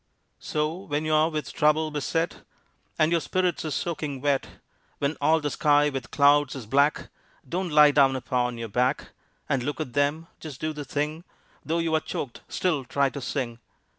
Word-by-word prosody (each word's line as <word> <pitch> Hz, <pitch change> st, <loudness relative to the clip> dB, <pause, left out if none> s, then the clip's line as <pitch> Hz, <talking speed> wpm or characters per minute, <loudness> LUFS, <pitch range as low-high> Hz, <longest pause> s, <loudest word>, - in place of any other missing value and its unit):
So 150 Hz, +1 st, -1 dB
when 155 Hz, -5 st, -3 dB
you're 155 Hz, +1 st, +3 dB
with 155 Hz, -2 st, -4 dB
trouble 155 Hz, +1 st, +2 dB
beset, 165 Hz, +3 st, -2 dB, 0.6 s
And 155 Hz, +1 st, +3 dB
your 170 Hz, -1 st, +2 dB
spirits 185 Hz, +2 st, 0 dB
are -, -, -2 dB
soaking 150 Hz, -2 st, -3 dB
wet, 140 Hz, 0 st, 0 dB, 0.5 s
When 140 Hz, +2 st, -1 dB
all 155 Hz, +3 st, +4 dB
the 145 Hz, -2 st, -2 dB
sky 145 Hz, +1 st, +3 dB
with 135 Hz, -3 st, -5 dB
clouds 145 Hz, -1 st, +4 dB
is 130 Hz, -4 st, -7 dB
black, 140 Hz, +6 st, +2 dB, 0.4 s
Don't 180 Hz, +1 st, -2 dB
lie 150 Hz, -1 st, +7 dB
down 135 Hz, -2 st, +4 dB
upon 125 Hz, -1 st, -1 dB
your 115 Hz, 0 st, -4 dB
back 125 Hz, +6 st, 0 dB, 0.4 s
And 135 Hz, -4 st, 0 dB
look 145 Hz, +5 st, -3 dB
at 130 Hz, -6 st, -4 dB
them. 145 Hz, +4 st, +1 dB
Just 150 Hz, -5 st, -9 dB
do 155 Hz, 0 st, -2 dB
the 150 Hz, -1 st, -6 dB
thing; 150 Hz, +4 st, -3 dB, 0.4 s
Though 165 Hz, +2 st, -1 dB
you 165 Hz, -1 st, 0 dB
are 160 Hz, -, +4 dB
choked, 135 Hz, -5 st, -6 dB
still 160 Hz, -7 st, 0 dB
try 140 Hz, +2 st, +1 dB
to 140 Hz, -, -6 dB
sing. 125 Hz, -2 st, -3 dB
145 Hz, 180 wpm, -26 LUFS, 135-155 Hz, 0.6 s, lie